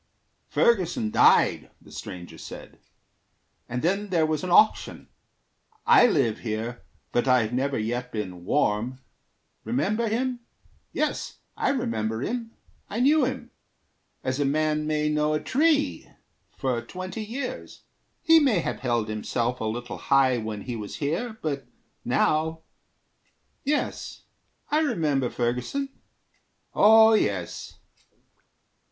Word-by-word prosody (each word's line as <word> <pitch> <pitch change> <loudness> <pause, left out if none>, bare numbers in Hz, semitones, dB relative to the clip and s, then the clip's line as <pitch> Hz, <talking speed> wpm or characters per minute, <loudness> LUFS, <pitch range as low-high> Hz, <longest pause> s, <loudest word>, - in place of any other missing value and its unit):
"Ferguson 175 - +1
died," - - +4
The - - -18
stranger 85 -3 -8
said, - - -10 0.9
"and 125 +3 -3
then 195 +4 0
there 165 -4 +2
was 155 +1 -1
an 185 - -3
auction. 215 +5 +3 0.8
I 440 - +7
live 135 - +1
here, 115 +1 -4 0.3
but 120 +2 +1
I've 125 -3 +3
never 135 +2 0
yet 120 +3 -3
been 95 -5 -5
warm. 115 +2 0 0.7
Remember 190 - 0
him? 245 +3 -1 0.5
Yes, - - -2 0.2
I - - 0
remember 230 - -1
him. 230 - -3 0.4
I 215 - -3
knew 285 +2 +4
him 260 - -5 0.7
as 130 +2 -2
a - - +3
man 150 +2 0
may 150 -1 0
know 150 0 +1
a - - 0
tree 290 - +1 0.5
For 125 -3 -1
twenty 185 - -6
years. 250 +5 -6 0.4
He 325 0 +7
may 270 - +3
have 170 - -2
held 120 -4 0
himself 115 +3 -2
A - - -1
little 120 +3 -4
high 130 -3 +3
when 110 -2 -5
he 120 +2 -5
was 105 -3 -6
here, 215 +11 -2
but 140 -3 -3 0.4
now... 160 +1 +1 1.0
Yes, 290 +1 -2 0.5
I 300 - +3
remember 150 - +1
Ferguson. 125 - -2 0.8
Oh, 220 +1 +7
yes." 95 - -1
150 Hz, 120 wpm, -26 LUFS, -, 1.0 s, I